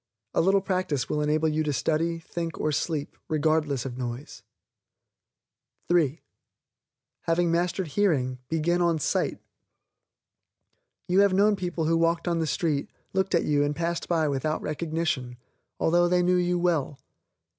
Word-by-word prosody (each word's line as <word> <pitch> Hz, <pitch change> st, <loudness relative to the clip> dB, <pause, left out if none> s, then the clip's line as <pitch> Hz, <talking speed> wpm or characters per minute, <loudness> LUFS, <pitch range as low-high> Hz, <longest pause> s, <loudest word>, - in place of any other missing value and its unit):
A -, -, +3 dB
little 195 Hz, +3 st, +3 dB
practice 185 Hz, -, -1 dB
will 150 Hz, -, 0 dB
enable 155 Hz, +1 st, +1 dB
you 155 Hz, 0 st, 0 dB
to 150 Hz, -1 st, 0 dB
study, 165 Hz, +4 st, 0 dB
think 165 Hz, 0 st, -5 dB
or 155 Hz, -, 0 dB
sleep, 150 Hz, 0 st, -2 dB
regardless 155 Hz, -4 st, +1 dB
of 130 Hz, -1 st, -6 dB
noise. 125 Hz, +3 st, -6 dB, 1.5 s
(3) 165 Hz, -4 st, +2 dB, 1.1 s
Having 165 Hz, 0 st, +2 dB
mastered 175 Hz, +1 st, 0 dB
hearing, 140 Hz, -9 st, +1 dB
begin 170 Hz, +2 st, +1 dB
on 170 Hz, -2 st, +2 dB
SIGHT. 150 Hz, -, -1 dB, 1.7 s
You 180 Hz, +2 st, +3 dB
have 200 Hz, -2 st, +4 dB
known 205 Hz, +2 st, +4 dB
people 175 Hz, -4 st, -3 dB
who 165 Hz, +1 st, +2 dB
walked 165 Hz, +1 st, +1 dB
on 170 Hz, -1 st, +1 dB
the 160 Hz, -, 0 dB
street, 155 Hz, -5 st, -1 dB, 0.2 s
looked 190 Hz, -1 st, +1 dB
at 170 Hz, -, +2 dB
you 145 Hz, -1 st, +2 dB
and 145 Hz, 0 st, -1 dB
passed 170 Hz, +2 st, -2 dB
by 165 Hz, -3 st, +2 dB
without 145 Hz, +2 st, -1 dB
recognition, 155 Hz, -5 st, -2 dB, 0.4 s
although 175 Hz, +1 st, +3 dB
they 180 Hz, 0 st, +2 dB
knew 180 Hz, +1 st, +3 dB
you 180 Hz, 0 st, +1 dB
well. 165 Hz, -5 st, 0 dB
165 Hz, 145 wpm, -26 LUFS, 150-175 Hz, 1.7 s, have